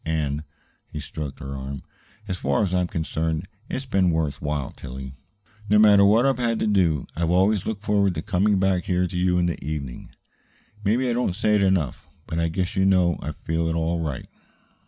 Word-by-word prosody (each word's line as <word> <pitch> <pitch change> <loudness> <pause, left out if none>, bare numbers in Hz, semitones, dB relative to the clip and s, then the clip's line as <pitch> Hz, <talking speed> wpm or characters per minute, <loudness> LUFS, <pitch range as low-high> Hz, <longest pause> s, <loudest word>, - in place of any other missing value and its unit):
And," 75 -2 -1 0.4
he 75 - -7
stroked 75 -1 -6
her 70 0 -6
arm, 70 +1 -6 0.4
"as 90 -2 -3
far 70 +9 +1
as 95 -2 -1
I 90 - +3
am 90 - 0
concerned, 80 +1 -2 0.2
it's 135 - -3
been 95 -7 +2
worth 80 -3 -1
while, 75 -2 -2
Tillie. 65 +1 -8 0.6
No 105 - +5
matter 105 -2 +7
what 110 +5 +5
I've 135 -2 +2
had 115 -2 +1
to - - +2
do, 90 -9 +2
I've 85 0 0
always 95 +3 +2
looked 110 -2 -3
forward 100 -4 +2
to 80 - -3
coming 100 0 +2
back 95 -2 +1
here 90 0 +1
to 90 0 -5
you 90 0 +2
in 90 - +2
the 85 - -3
evening. 70 -4 -5 0.7
Maybe 115 +6 +2
I 120 - +1
don't 120 -7 0
say 105 +1 +1
it 105 - +4
enough, 95 -8 0 0.2
but 80 - -3
I 85 - +2
guess 90 +2 -2
you 95 - +2
know 90 -3 +3
I 75 - -4
feel 80 +3 -2
it 80 - -1
all 85 +1 0
right." 75 -5 -3
90 Hz, 210 wpm, -24 LUFS, 80-100 Hz, 0.7 s, matter